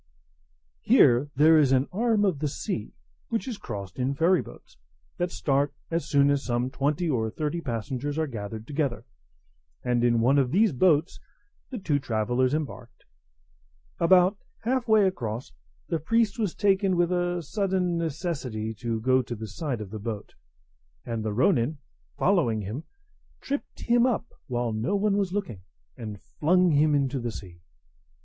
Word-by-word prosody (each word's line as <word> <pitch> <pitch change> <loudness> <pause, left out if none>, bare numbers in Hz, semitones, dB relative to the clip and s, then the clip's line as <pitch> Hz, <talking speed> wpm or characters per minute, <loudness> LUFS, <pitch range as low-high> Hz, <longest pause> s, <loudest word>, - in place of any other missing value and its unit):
Here 125 - +5
there 155 +3 +6
is 140 -3 +3
an 135 +1 +3
arm 215 +1 +2
of 180 -8 0
the 150 - 0
sea, 140 - -4 0.3
which 230 +3 -2
is 230 -5 -5
crossed 100 - -7
in 130 +2 0
ferry 170 +4 +3
boats, - - -14 0.4
that 175 0 0
start 140 -2 0 0.2
as 165 0 -2
soon 140 0 +4
as 140 -1 0
some 120 +1 -1
twenty 145 +6 0
or 115 -7 0
thirty 155 +7 -3
passengers 130 +3 -3
are 160 - +1
gathered 110 -4 -6
together; 140 -3 -2 0.8
and 120 -1 +1
in 120 -1 +3
one 130 +5 +4
of 130 -3 +2
these 200 - +3
boats 160 +3 +2 0.5
the 255 - -5
two 155 -8 0
travellers 125 +2 0
embarked. 130 -6 -6 0.9
About 185 +3 +4 0.2
half 250 +1 0
way 215 -2 +5
across, 120 - -3 0.4
the 165 - -1
priest 225 +6 +1
was 205 -6 -1
taken 195 -2 +2
with 175 0 +2
a 175 -1 0
sudden 185 0 0
necessity 140 - -3
to 115 +1 -3
go 130 +2 +3
to 120 -1 -6
the 110 0 -6
side 130 - -4
of 100 -3 -8
the 110 - -5
boat; 105 -1 -6 0.7
and 115 -2 -3
the 110 - -2
ronin, 120 +5 +2 0.4
following 150 - +2
him, 110 +10 -5 0.5
tripped 280 +1 -5
him 240 +1 +3
up 240 -5 0 0.2
while 120 -2 -1
no 115 - -1
one 200 0 +2
was 200 -3 0
looking, 190 - -4 0.3
and 105 -3 -7 0.2
flung 180 +3 +4
him 150 0 +4
into 140 -1 0
the 120 -1 -3
sea. 90 -5 -10
145 Hz, 160 wpm, -26 LUFS, 120-180 Hz, 0.9 s, there